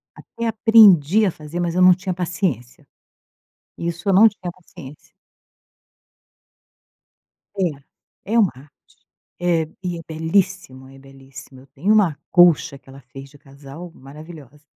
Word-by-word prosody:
Até 230 0 -7
aprendi 215 - +4
a 185 - 0
fazer, 155 +3 -9
mas 175 0 -2
eu 185 - +1
não 180 0 +7
tinha 185 0 -5
paciência, 165 - -4 0.9
isso 170 +2 -6
eu 195 - +2
não 215 +4 +7
tinha 185 -3 -9
paciência. 165 -5 -15 2.5
É 190 - 0 0.7
é - - +2
uma 190 - -1
arte, 145 - -28 0.5
eh, 165 -2 +1 0.2
e 175 -1 -4
é - - -8
belíssimo, 160 -4 -2
é 135 - -16
belíssimo, 135 -1 -15
eu 135 - -20
tenho 195 +10 +1
uma 185 -9 +2
colcha 175 -4 +3
que 135 - -23
ela 135 +1 -14
fez 135 +2 -13
de 145 - -19
casal, 140 +4 -13
maravilhosa. 150 +1 -14
165 Hz, 140 wpm, -20 LUFS, 140-185 Hz, 2.5 s, não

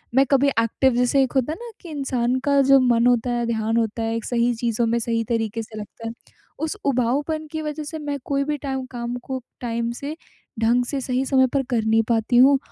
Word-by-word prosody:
मैं 270 +1 +6
कभी 275 0 +4
एक्टिव 235 +3 +2
जैसे 250 +3 +3
एक 260 - -2
होता 265 +1 +1
है - - -8
ना, 475 -1 -8
कि 350 - -10
इंसान 260 -4 -1
का 280 -1 +4
जो 275 0 +6
मन 240 -2 +3
होता 245 0 +2
है, 240 0 0
ध्यान 225 0 0
होता 225 0 -1
है 225 0 -1
एक 230 - -4
सही 240 0 +1
चीज़ों 230 0 0
में 230 +1 +1
सही 230 0 -1
तरीक़े 225 0 -1
से 220 0 -11
लगता 220 +2 -8
है, 225 - -4 0.5
उस 315 0 -2
उबाऊपन 280 +5 0
की 315 - -3
वज़ह 305 0 -4
से 315 +2 -6
मैं 290 -1 -3
कोई 280 0 0
भी 295 +1 -2
टाइम 265 -2 -4
काम 240 -1 -4
को, 260 -1 -4 0.2
टाइम 235 -1 -2
से, 280 +5 -6 0.4
ढंग 235 +2 +3
से, 275 +2 -3
सही 255 +1 -1
समय 260 -1 +4
पर 275 -1 +2
कर 235 -4 +1
नहीं 225 +1 +3
पाती 230 +1 +2
हूँ 270 +3 +7
250 Hz, 230 wpm, -23 LUFS, 230-275 Hz, 0.5 s, हूँ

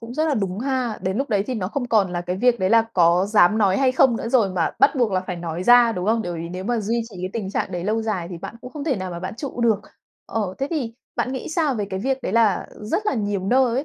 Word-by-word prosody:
cũng 230 +1 -8
rất 310 +3 +1
là 290 - +1
đúng 195 -3 -2
ha. 255 -3 -1
Đến 190 +2 -1
lúc 275 +1 -1
đấy 200 -3 +1
thì 255 - -2
nó 190 -4 -2
không 250 +2 -3
còn 200 -6 +2
là 175 - -2
cái 180 +1 -3
việc, 240 +2 +3
đấy 185 +2 +1
là, 230 -1 +6
có 175 +1 +4
dám 210 0 +4
nói 195 -3 +3
hay 260 -2 +3
không 260 -3 +4
nữa 230 - -4
rồi, 235 -6 +3
mà 170 -3 0
bắt 280 +2 +5
buộc 235 -6 +1
là 185 - +1
phải 185 -1 -5
nói 170 +1 -4
ra, 240 +1 +6
đúng 180 -1 -3
không? 225 0 +2
Bởi 175 - -4
vì 170 0 -5
nếu 185 +1 -6
mà 235 +1 0
duy 230 +3 -1
trì 190 - -11
cái 185 - -3
tình 205 -4 -4
trạng - - -2
đấy 175 0 -3
lâu 220 +2 0
dài 190 -6 -2
thì 175 - -6
bạn 210 - -8
cũng 250 - -10
không 295 -2 -6
thể 275 -7 0
nào 185 -1 -4
mà 170 0 -6
bạn 185 - -5
trụ 265 -2 -5
được. 220 -4 +3 0.5
Ờ, 205 -4 -2
thế 275 - -1
thì, 250 -8 -2 0.2
bạn 255 - -1
nghĩ 260 - -5
sao 315 -5 0
về 210 -2 -2
cái 190 - -3
việc, 265 +4 -1
đấy - - -3
là 225 -4 +2 0.2
rất 410 - -2
là - - +1
nhiều 205 -4 -2
nơi 250 0 +3
ấy, 270 +4 -1
220 Hz, 310 wpm, -22 LUFS, 185-250 Hz, 0.5 s, là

